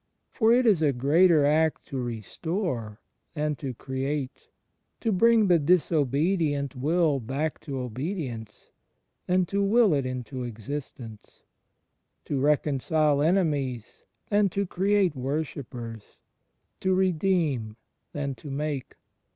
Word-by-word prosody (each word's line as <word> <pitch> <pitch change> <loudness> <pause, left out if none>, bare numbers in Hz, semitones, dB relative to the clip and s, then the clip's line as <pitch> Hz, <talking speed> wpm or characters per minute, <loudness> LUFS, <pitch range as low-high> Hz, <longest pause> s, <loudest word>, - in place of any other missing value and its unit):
For 225 -1 +3
it 250 +1 +4
is 200 -8 +4
a 145 -3 +3
greater 150 +5 +4
act 155 +2 +2
to 135 - -4
restore 120 - -4 0.4
than 150 0 0
to 130 -1 -5
create, 135 +2 -4 0.5
to 225 - 0
bring 225 +3 +4
the 175 -3 +4
dis 170 +4 +2
obedient 145 -1 +1
will 150 +2 +1
back 135 +6 -3
to 140 -4 -6
obedience 125 - -5 0.6
than 180 0 +2
to 200 +3 -1
will 215 -2 +4
it 140 -3 0
into 130 +1 -5
existence, 120 -1 -8 0.8
to 140 - -2
reconcile 150 +1 +2
enemies 145 - 0 0.3
than 205 -1 +3
to 200 +3 -1
create 190 -2 +1
wor 135 +5 -1
shippers, 115 -6 -9 0.6
to 190 0 +1
redeem 165 - 0 0.3
than 140 -2 -3
to 145 - -11
make. 140 -1 -4
150 Hz, 120 wpm, -26 LUFS, 130-180 Hz, 0.8 s, it